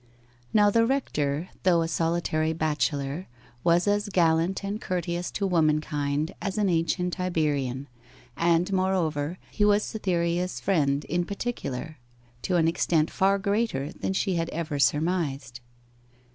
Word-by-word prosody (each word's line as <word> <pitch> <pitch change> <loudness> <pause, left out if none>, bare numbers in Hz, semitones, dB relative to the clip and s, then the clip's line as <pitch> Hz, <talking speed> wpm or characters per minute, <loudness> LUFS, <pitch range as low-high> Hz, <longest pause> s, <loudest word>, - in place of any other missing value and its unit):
Now 205 -1 +5
the 230 +2 +4
rector, 170 - -1
though 175 -3 +3
a - - -2
solitary 165 -1 0
bachelor, 150 0 -1 0.4
was 175 +3 +3
as 205 0 +1
gallant 170 +1 +2
and 205 +2 -3
courteous 175 -1 -2
to 200 - -1
womankind 155 -2 +1
as 195 0 -3
an 205 -2 +2
ancient 180 +2 0
Iberian; 145 -7 -1 0.5
and, 170 +3 +2
moreover, 175 -4 0
he 210 - 0
was 205 0 +4
Cytherea's 180 -3 -1
friend 145 -7 +1
in 175 +2 0
particular, 160 - -5 0.4
to 185 - -1
an 165 -2 +3
extent 165 -1 +1
far 195 +1 +3
greater 200 -7 -1
than - - -3
she 190 0 0
had 165 0 -1
ever 155 -3 -3
surmised. 145 -5 0
170 Hz, 130 wpm, -26 LUFS, 155-190 Hz, 0.5 s, Now